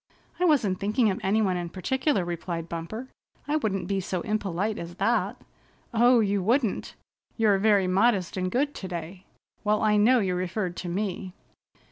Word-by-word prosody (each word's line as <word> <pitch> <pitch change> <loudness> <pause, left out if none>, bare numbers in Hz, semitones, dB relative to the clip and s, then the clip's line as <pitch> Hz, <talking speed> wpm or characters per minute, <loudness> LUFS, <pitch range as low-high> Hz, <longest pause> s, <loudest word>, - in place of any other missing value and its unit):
"I 360 - +3
wasn't 230 - +2
thinking 210 +2 +2
of 190 - -4
any 215 +3 +2
one 185 -3 +1
in 175 -1 -4
particular," 260 - 0
replied 170 -1 -4
Bumper. 170 +10 -6 0.4
"I 295 - 0
wouldn't 195 - -2
be 195 0 0
so 185 -1 -3
impolite 210 0 -2
as 170 +1 -7
that." - - 0 0.5
"Oh, 240 +1 +5
you 200 -1 +1
wouldn't! 230 +2 0 0.4
You're 210 -4 +3
very 205 -2 +4
modest 190 0 +2
and 185 -1 -1
good 285 +8 0
today. 180 0 -7 0.4
Well, 210 0 +1
I 210 -1 +4
know 235 +5 +5
you 190 -5 +1
referred 180 0 -2
to 180 - -4
me." 185 0 -3
195 Hz, 165 wpm, -26 LUFS, 180-220 Hz, 0.5 s, Oh